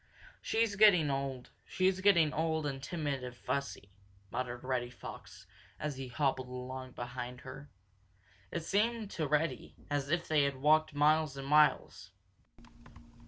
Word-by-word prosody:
"She's 225 -2 +1
getting 185 -8 +6
old. 135 -2 -4
She's 185 0 0
getting 170 -6 +4
old 160 -1 0
and 135 -2 -3
timid 145 -4 -3
and 125 -1 -7
fussy," 130 -7 -4 0.4
muttered 125 -1 -4
Reddy 125 -2 -1
Fox, 125 - -11 0.3
as 150 -3 -3
he 135 -1 -5
hobbled 130 0 -1
along 130 0 -7
behind 125 0 -6
her. 140 +1 -10 0.8
It 170 - -4
seemed 215 +3 0
to 155 -3 -2
Reddy 150 +3 -1 0.2
as 140 -1 -1
if 170 +2 0
they 155 -2 +3
had 140 -1 -1
walked 155 +2 +3
miles 150 -1 +3
and 135 0 -6
miles. 150 +1 +3
145 Hz, 140 wpm, -33 LUFS, 130-160 Hz, 0.8 s, getting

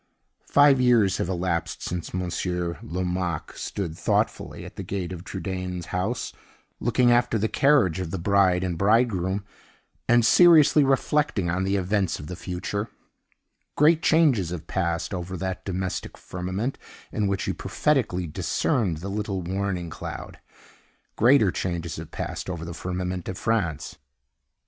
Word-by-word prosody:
Five 145 -2 +5
years 115 -6 +4
have - - -2
elapsed 85 -2 -2
since 90 -1 -4
Monsieur 90 -1 -2
Lomaque 90 -2 -3
stood 85 -6 -4
thoughtfully - - -1
at - - -11
the - - -5
gate 95 -3 -4
of 85 -1 -8
Trudaine's 90 -3 -4
house, 95 +7 -2 0.5
looking 120 +1 +3
after 120 -1 +3
the 110 +1 +1
carriage 130 - +3
of 90 -3 -3
the 95 - -3
bride 95 0 +3
and 90 -3 -2
bridegroom, 100 -3 +2 0.6
and 120 -1 +5
seriously 155 0 +7
reflecting 135 - +1
on 95 +2 0
the 95 +1 +1
events 95 0 0
of 75 - -8
the 90 - -6
future. 100 +4 -4 0.9
Great 155 +2 +5
changes 145 - +3
have 85 -2 -6
passed 85 +1 -2
over 90 0 -4
that 95 0 -4
domestic 95 -1 -3
firmament 95 +8 -4 0.3
in 105 -4 0
which 100 0 -1
he - - -1
prophetically 120 -12 0
discerned 85 +2 -1
the 95 - -5
little 100 -2 -3
warning 90 -1 -2
cloud. - - -7 0.8
Greater 120 -4 +5
changes 85 -3 -3
have - - -7
passed - - -5
over 85 -2 -4
the 85 - -6
firmament 90 0 -4
of 95 - -5
France. 85 -10 -1
95 Hz, 145 wpm, -25 LUFS, 90-110 Hz, 0.9 s, seriously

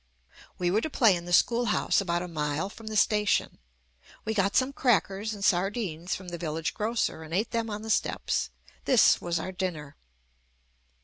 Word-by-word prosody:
We 175 -1 0
were 210 +4 +2
to 315 - -3
play 225 -9 +4
in 170 0 -6
the 175 - -7
schoolhouse 235 +2 +3
about 175 -2 -1
a - - -5
mile 155 +2 -2
from 220 +1 -12
the 215 0 -2
station. 210 0 +2 0.7
We 220 - -1
got 200 -1 +1
some 265 +1 +2
crackers 215 -5 +1
and 200 -1 -3
sardines 180 -2 0
from 185 -1 -8
the 175 -1 -6
vil 155 -3 -3
lage 160 0 -2
grocer 220 -6 -1
and 160 +1 -6
ate 210 +4 0
them 230 -1 -1
on 210 0 -5
the 220 - -3
steps. - - 0 0.4
This 255 -4 +5
JUST - - +5
ME - - -10
was 170 -1 0
our 185 - -4
dinner. 175 -6 -4
195 Hz, 195 wpm, -28 LUFS, 175-220 Hz, 0.7 s, This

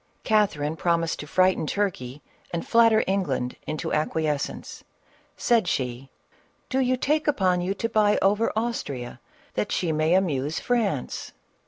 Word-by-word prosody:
Catherine 175 -9 +1
promised 165 -1 0
to 150 - -7
frighten 185 -1 +2
Turkey 150 -10 -2 0.3
and 170 -1 -4
flat 230 0 +6
ter 220 0 +3
England 145 -11 -1
into 155 0 -3
acquiescence; 155 -1 -2 0.5
said 230 -6 +2
she, 130 -2 -2 0.3
" - - -38
Do 265 - +1
you 255 -1 +2
take 300 +4 0
upon 185 -10 +2
you 185 +3 -1
to 230 - -1
buy 215 -2 +3
over 205 +4 +2
Austria, 140 - -3 0.3
that 210 - -2
she 170 -3 0
may 155 +2 +2
amuse 155 -5 0
France 215 - -1
180 Hz, 145 wpm, -25 LUFS, 150-215 Hz, 0.5 s, flat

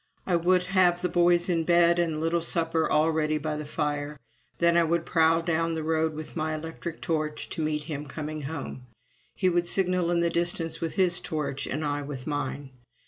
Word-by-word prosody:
I 180 - +1
would 180 +2 +3
have 180 -1 +2
the 180 - +1
boys 175 0 +3
in 170 -3 +1
bed 170 0 +4
and 170 -2 +1
the - - -3
little 165 +2 0
supper 165 -1 0
all 155 +2 +3
ready 155 -1 +1
by 155 0 -3
the 150 -1 -5
fire; 150 -1 -2 0.4
then 170 0 +3
I 170 - +5
would 170 +1 0
prowl 165 0 +3
down 165 0 0
the 160 - -3
road 160 0 0
with 155 0 -7
my 155 -1 -1
electric 165 +1 -6
torch, 155 -2 -2
to - - -4
meet 155 -1 -1
him 150 -1 -5
coming 155 +1 -5
home; 140 -3 -6 0.5
he 185 - +1
would 175 -1 +2
signal 180 -2 +1
in 175 -1 +2
the 170 0 +1
distance 170 -1 -1
with 165 -1 -3
his 180 -3 +2
torch, 145 -3 -3
and 155 +3 -2
I 145 0 -1
with 140 -3 -7
mine. 145 -2 -3
160 Hz, 205 wpm, -27 LUFS, 150-170 Hz, 0.5 s, I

